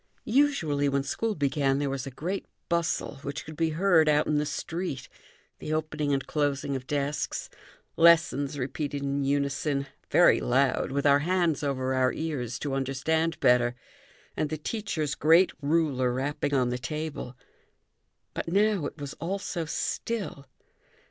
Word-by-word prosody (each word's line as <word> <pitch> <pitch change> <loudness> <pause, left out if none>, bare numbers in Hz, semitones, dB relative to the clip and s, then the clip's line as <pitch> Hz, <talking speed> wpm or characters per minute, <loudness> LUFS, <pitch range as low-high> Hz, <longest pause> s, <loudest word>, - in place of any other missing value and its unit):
Usually, 175 - +2
when 140 0 0
school 220 +10 -2
began, 140 -2 +1
there 145 0 0
was 135 -1 -3
a - - -3
great 175 +9 -4 0.2
bustle, 170 -3 -1
which 140 0 -6
could 155 - -9
be 165 +1 +1
heard 170 -4 +4
out 150 0 +3
in 150 -1 +1
the 150 - -1
street, 165 -6 -4 0.5
the - - -5
opening 155 -2 -1
and 135 -1 0
closing 140 -2 -1
of 130 -1 -6
desks, 145 0 -2 0.5
lessons 165 -4 +4
repeated 140 +1 -3
in 140 0 -1
unison, 140 0 0 0.2
very - - +5
loud, 130 +2 +1
with 140 +1 -1
our 140 0 +6
hands 170 -2 +1
over 130 -2 -1
our 130 -1 +2
ears 135 -7 -3
to 145 -2 -3
understand 160 +5 0
better, 125 0 +4 0.6
and 155 - -1
the 155 - -3
teacher's 160 -4 -2
great 165 +5 +5
ruler 140 -4 +1
rapping 145 +3 -1
on 125 -2 +2
the 125 0 -2
table. 145 -1 -5 1.0
But - - -4
now 200 -2 +2
it - - -10
was 145 0 -5
all 185 +4 -2
so 175 -4 -4
still! 190 -2 -3
145 Hz, 155 wpm, -28 LUFS, 135-165 Hz, 1.0 s, our